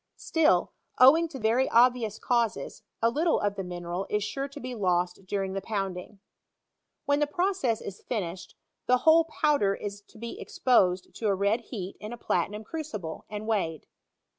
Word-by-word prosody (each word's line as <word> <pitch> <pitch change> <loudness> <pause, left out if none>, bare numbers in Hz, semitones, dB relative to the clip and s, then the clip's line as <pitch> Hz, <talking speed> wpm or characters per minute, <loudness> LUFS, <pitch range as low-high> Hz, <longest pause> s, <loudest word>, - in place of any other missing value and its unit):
Still, 300 - +2 0.3
owing 305 +7 +7
to 310 -4 -8
very 235 +3 +2
obvious 235 -3 +3
causes, 235 -2 -1 0.2
a 230 - +4
little 320 +6 +2
of 205 -1 0
the 195 - -4
mineral 175 +1 -4
is 210 0 0
sure 270 +7 -3
to 280 +1 -10
be 255 -1 -6
lost 180 -3 -1
during 195 -1 -2
the 195 - -3
pounding'. 195 -1 -4 0.9
When 285 0 +2
the 295 - +2
process 350 - 0
is 200 - -8
finished, 190 -5 -5 0.3
the 250 - +5
whole 325 +1 +7
powder 295 -11 +1
is 205 0 -6
to - - -18
be 235 +1 -7
exposed 185 -8 +2
to 220 - -3
a 200 - +3
red 200 +4 +1
heat 200 -5 -7
in 215 +3 -7
a - - -7
platinum 210 +1 -1
crucible, 215 - -6
and 210 0 -5
weighed. 185 -8 -1
215 Hz, 170 wpm, -28 LUFS, 195-255 Hz, 0.9 s, owing